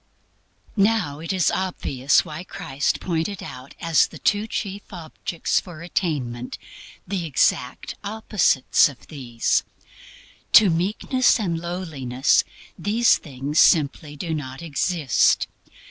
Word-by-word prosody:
Now 200 -8 +1
it 165 +3 -4
is 185 -5 +2
obvious 140 -8 +1
why 155 +1 -7
Christ 160 -8 -2
pointed 180 +3 -2
out 130 +2 -10
as 165 -2 +3
the - - -12
two 205 +2 +1
chief 200 -2 -4
objects 170 -1 -2
for 170 -3 -10
attainment 135 -9 -3 0.5
the 190 -3 -2
exact 125 -3 0
opposites 200 -11 +2
of 135 -4 -14
these. 125 -6 0 0.9
To 205 -5 +8
meekness 215 +10 +2
and 170 -6 -1
lowliness 155 -7 0 0.4
these 225 +4 +3
things 145 +1 -3
simply 150 -2 +3
do 165 +2 -4
not 140 0 -5
exist. 155 -2 +2
165 Hz, 115 wpm, -23 LUFS, 140-190 Hz, 0.9 s, To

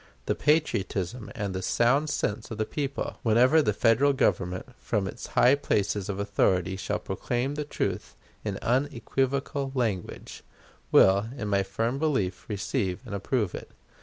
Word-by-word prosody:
The - - +1
patriotism 115 - 0
and 100 -2 -3
the 95 - -3
sound 135 +10 +2
sense 110 -5 -2
of 110 - -6
the 110 - 0
people, 140 +1 -4
whenever 125 +7 +5
the 125 - +2
Federal 115 +7 +3
Government 90 -8 0
from 105 -4 -1
its - - -7
high 125 - +7
places 105 -7 0
of 100 - -2
authority 95 -2 +1
shall 95 - -2
proclaim 125 +3 -2
the 150 +1 -3
truth - - -3 0.3
in 100 -2 -3
unequivocal 135 +1 0
language, 110 -8 -3 0.5
will, 100 +3 +6
in 105 -4 -3
my 100 -1 +3
firm 115 +7 -2
belief, 125 - -1
receive 100 -1 -2
and 115 - -7
approve 100 0 -1
it. - - -7
110 Hz, 150 wpm, -27 LUFS, 100-135 Hz, 0.5 s, high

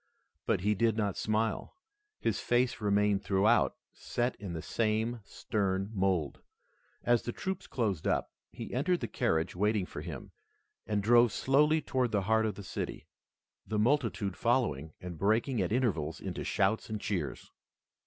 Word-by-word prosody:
But - - +2
he 105 +3 +2
did 115 +1 +1
not 105 -3 0
smile. 110 +1 -1 0.4
His - - 0
face 120 -1 +1
remained 105 -1 +2
throughout 105 +4 +3 0.2
set 120 +1 -2
in 100 -4 -6
the 80 - -4
same 115 +1 0
stern 95 -1 -2
mold. 95 -7 0 0.6
As 120 -1 +3
the 120 - -4
troops 190 +9 -4
closed 100 - -1
up, - - 0 0.2
he - - -7
entered 170 +8 +1
the - - -2
carriage 80 +1 0
waiting 105 +1 +1
for 75 - -7
him, 80 -4 -7 0.6
and 105 -2 0
drove 120 +1 +6
slowly 150 +7 +3
toward 125 -3 0
the 100 -2 +1
heart 110 +2 +2
of 105 - -3
the 100 - -8
city, - - -5 0.6
the 110 - -1
multitude 105 -5 +1
following 80 - 0
and 85 -3 -7
breaking 110 +3 +2
at 90 - -1
intervals 100 - 0
into - - -4
shouts 100 +4 +1
and 110 -1 -3
cheers. 90 -9 -3
105 Hz, 155 wpm, -31 LUFS, 95-120 Hz, 0.6 s, drove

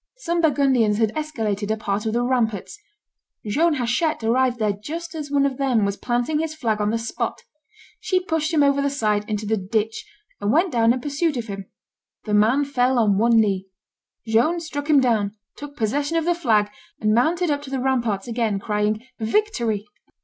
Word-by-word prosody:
Some 345 -8 -1
Burgundians 265 -9 +3
had 220 -1 +1
escaladed 220 -10 -2
a 220 - 0
part 210 0 -2
of 220 - -1
the 240 +1 +1
ramparts; 235 -6 -1 0.7
Joan 300 +9 +2
Hachette 255 +3 0
arrived 250 +2 +2
there 215 -3 +1
just 320 +11 -7
as 300 -3 -5
one 280 -1 +2
of 270 -2 -1
them 250 -6 +2
was 200 0 -1
planting 245 +7 -1
his 315 -1 -3
flag 220 -7 -1
on 210 - +1
the 225 - 0
spot; 230 0 -4 0.6
she 370 - +1
pushed 320 -3 -1
him 305 -3 +3
over 280 0 +3
the 280 - +1
side 215 -6 -1
into 210 0 -2
the 220 +1 0
ditch, 215 +3 -2 0.4
and 205 +1 0
went 335 +6 +3
down 230 -2 +3
in 250 +1 -1
pursuit 290 +2 -1
of 235 - -3
him; 195 -3 -7 0.6
the 210 - -2
man 225 +8 +4
fell 260 -2 +1
on 205 -4 +3
one 230 +1 +4
knee; 195 -3 +1 0.6
Joan 235 +10 +2
struck 305 -2 -5
him 295 -2 +6
down, 215 -5 +1 0.2
took 290 0 -10
possession 285 +8 0
of 325 - 0
the 350 - +3
flag, 220 -11 +1 0.3
and 215 -1 +2
mounted 320 +8 +2
up 290 0 -1
to 285 - -9
the 270 - -2
ramparts 235 -6 0
again, 230 -3 0
crying, 210 +2 -1
"Victory!" 230 - 0
240 Hz, 195 wpm, -22 LUFS, 215-290 Hz, 0.7 s, him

